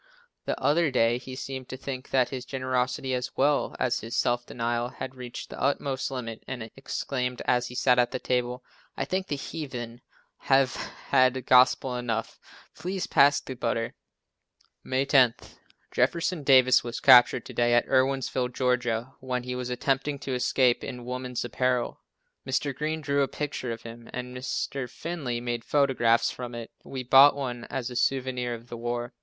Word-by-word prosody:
The - - -2
other 160 +2 +3
day 120 -2 +2
he 130 +1 -8
seemed 130 -1 -6
to 130 - -6
think 130 0 -6
that 130 -2 +2
his 130 -2 -5
generosity, 130 0 -1
as 125 0 -3
well 145 +1 +2
as 125 -1 +1
his 115 +2 -6
self 120 0 +1
denial, 120 0 -2
had 130 +1 -7
reached 125 -2 -8
the - - -8
utmost 140 -1 0
limit 115 -4 -6
and 115 -3 -6
exclaimed 125 -2 -3
as 125 0 +2
he 125 - -9
sat 125 0 +3
at 120 - +3
the - - -3
table, 125 0 -1 0.3
"I - - -1
think 185 0 -2
the 145 - -2
heathen 125 -5 -6 0.4
have 135 -1 +3
had 130 -1 +1
gospel 130 0 +4
enough, 115 -2 -3 0.3
please 185 +1 -3
pass 140 +1 +5
the 130 - -7
butter." 115 -2 -2 0.9
May 130 +1 0
10. 130 -4 +5 0.6
Jeff - - +2 0.3
Davis 130 -2 +6
was 120 0 -5
captured 125 -2 +7
to - - -9
day 120 0 +3
at 120 - +3
Irwinsville, 130 -1 +1 0.3
Ga., 120 +1 -2
when 125 -1 -3
he 125 0 -4
was 125 0 -4
attempting 135 +3 0
to 135 -1 -5
escape 125 0 +2
in 125 -1 -6
woman's 125 -1 -4
apparel. 125 0 -1 0.4
Mr. 135 +2 -1
Green 155 +3 -2
drew 140 -1 +1
a 135 - +2
picture 140 -4 -4
of 115 0 -6
him, 115 0 -10
and 125 0 -6
Mr. 130 0 -3
Finley 140 -6 -4
made 120 -1 -3
photographs 130 -5 +2
from 125 -1 -7
it. 115 -1 -7
We 130 -1 -6
bought 135 +3 +7
one 125 -4 -4
as 130 -2 -4
a - - -7
souvenir 125 -1 0
of 115 +1 -13
the 120 - -7
war. 120 +1 -3
125 Hz, 170 wpm, -27 LUFS, 120-135 Hz, 0.9 s, captured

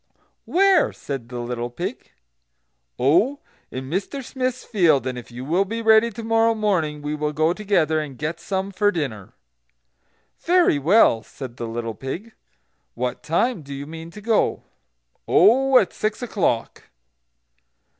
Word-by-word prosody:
"Where?" 380 -2 +4
said 135 -5 -6
the 125 -1 -5
little 120 0 -4
pig. 120 - -6 0.9
"Oh, 175 - +3 0.3
in 130 +1 -6
Mr 205 - -3
Smith's 255 -1 -3
field, 170 - +2
and 130 -1 -2
if 125 - -9
you 125 +2 -7
will 175 +7 +2
be 225 +3 -5
ready 220 +1 +5
to 230 +1 -8
morrow 225 0 +2
morning 165 -9 -1
we 150 +1 -2
will 150 0 -2
go 155 +3 +2
together, 180 -6 +1
and 145 -4 -6
get 155 +4 -3
some 190 +3 -3
for 205 +2 +2
dinner." 130 - -4 1.1
"Very 350 - +3
well," 160 - +4
said 125 0 -10
the 115 - -4
little 115 0 -4
pig. 150 - -6 0.6
"What 125 +1 -3
time 185 +5 0
do 140 -1 -8
you 140 +1 -6
mean 165 +2 -9
to 210 +5 -11
go?" 220 0 +1 0.6
"Oh, 260 +8 +5
at 195 - +2
six 215 +4 -2
o'clock." 190 - -1
170 Hz, 150 wpm, -22 LUFS, 135-220 Hz, 1.1 s, ready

